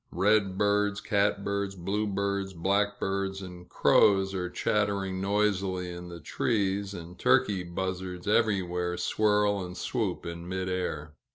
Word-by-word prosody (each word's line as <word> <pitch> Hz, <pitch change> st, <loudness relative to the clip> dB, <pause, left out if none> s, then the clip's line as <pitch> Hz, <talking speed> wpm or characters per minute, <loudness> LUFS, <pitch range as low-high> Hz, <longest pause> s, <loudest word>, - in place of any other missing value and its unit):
Redbirds, 105 Hz, +1 st, +2 dB
catbirds, 100 Hz, -1 st, 0 dB
bluebirds, 100 Hz, +1 st, -1 dB
blackbirds, 95 Hz, +1 st, 0 dB
and 90 Hz, -1 st, -10 dB
crows 95 Hz, -1 st, +4 dB
are 90 Hz, -2 st, -2 dB
chattering 100 Hz, -1 st, 0 dB
noisily 95 Hz, -3 st, 0 dB
in 90 Hz, 0 st, -8 dB
the 85 Hz, -1 st, -8 dB
trees, 100 Hz, +2 st, -1 dB
and 85 Hz, +1 st, -9 dB
turkey 125 Hz, -7 st, +3 dB
buzzards 90 Hz, +1 st, -4 dB
everywhere 90 Hz, -5 st, +1 dB
swirl 105 Hz, +2 st, +2 dB
and 90 Hz, +1 st, -7 dB
swoop 105 Hz, -7 st, -2 dB
in 85 Hz, +1 st, -6 dB
mid 95 Hz, 0 st, -2 dB
air. 90 Hz, -5 st, -3 dB
95 Hz, 115 wpm, -28 LUFS, 90-100 Hz, -, crows